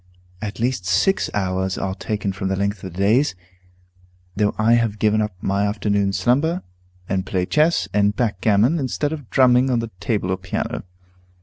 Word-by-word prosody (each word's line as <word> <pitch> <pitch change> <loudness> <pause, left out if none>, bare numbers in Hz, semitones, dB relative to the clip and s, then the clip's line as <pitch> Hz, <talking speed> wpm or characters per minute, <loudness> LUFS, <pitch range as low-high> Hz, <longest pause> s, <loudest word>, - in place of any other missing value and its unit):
At 105 +1 -5
least 120 -6 -1
six 100 - +2
hours 95 -1 -1
are 95 -1 -2
taken 105 0 -3
from 95 0 -3
the 95 - 0
length 100 0 -2
of 95 - -6
the 85 - -12
days, 110 +6 +2 1.0
though 105 0 +1
I 110 +2 +3
have 115 -3 +1
given 110 0 +2
up 105 -3 -3
my 100 +1 +1
afternoon 100 -1 0
slumber, 145 - +1 0.4
and 95 -1 -1
play 90 -1 -1
chess 155 - +2
and 105 0 +2
backgammon 110 - +2
instead 145 +3 -1
of 145 -7 -8
drumming 130 0 +4
on 125 - +2
the 115 -1 -3
table 100 -2 -1
or 95 - 0
piano. 95 -1 -4
105 Hz, 175 wpm, -21 LUFS, 95-120 Hz, 1.0 s, drumming